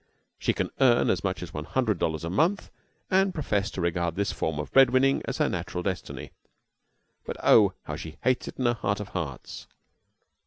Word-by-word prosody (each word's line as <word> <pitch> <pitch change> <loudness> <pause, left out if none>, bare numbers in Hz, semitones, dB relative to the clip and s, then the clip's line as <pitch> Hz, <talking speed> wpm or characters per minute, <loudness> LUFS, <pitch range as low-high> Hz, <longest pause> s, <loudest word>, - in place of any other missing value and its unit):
She - - +1
can - - -2
earn 125 -3 +4
as 95 - -1
much 95 -2 -2
as 80 -3 -9
one 75 - -4
hundred 110 -8 0
dollars 80 -1 -1
a 85 - -3
month, 170 - +1 0.4
and 190 0 +3
professes 105 - 0
to 95 - -3
regard 85 -1 -1
this 100 0 0
form 80 -2 -2
of 75 - -5
bread 135 -2 +7
winning 135 +2 +3
as - - -3
her - - +2
natural 90 - -3
destiny. 95 -2 -4 0.9
But, - - -6
oh! - - +6
how - - -5
she 80 0 -8
hates 130 0 +1
it - - -8
in 130 - -1
her 120 - +4
heart 100 -3 -2
of 105 -2 -6
hearts! 80 -8 -6
100 Hz, 200 wpm, -27 LUFS, 85-130 Hz, 0.9 s, bread